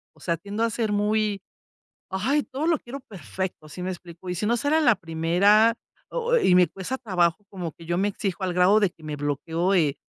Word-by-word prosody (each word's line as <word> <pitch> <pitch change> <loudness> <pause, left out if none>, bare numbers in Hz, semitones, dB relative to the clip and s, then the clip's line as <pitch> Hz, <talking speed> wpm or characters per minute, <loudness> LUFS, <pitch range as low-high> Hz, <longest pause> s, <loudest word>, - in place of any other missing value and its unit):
o - - -22
sea, 170 -2 -1
tiendo 205 +6 -3
a 230 - +2
ser 220 -1 -1
muy, 210 -1 +1 0.7
¡ay!, 260 +11 +1
todo 280 +4 -4
lo 330 -2 +3
quiero 265 +4 -8
perfecto, 175 - -6
¿si 180 - -7
me 185 - -3
explico? 175 0 -9
Y 180 - -1
si 210 - -2
no 235 +2 +2
será 295 +5 +2
la 245 -7 +5
primera 185 +7 +3 0.3
o 485 0 +1
y 185 - +4
me 180 -1 +6
cuesta 195 +10 -5
trabajo, 180 -5 +1
como 175 -5 -5
que 165 +2 -14
yo 175 0 0
me 200 +2 +2
exijo 195 -2 -3
al 180 - -1
grado 180 +4 +5
de 200 - +3
que 165 - -23
me 150 -1 -4
bloqueó, 160 +6 -1
eh, 150 -5 +2
190 Hz, 220 wpm, -25 LUFS, 170-220 Hz, 0.7 s, me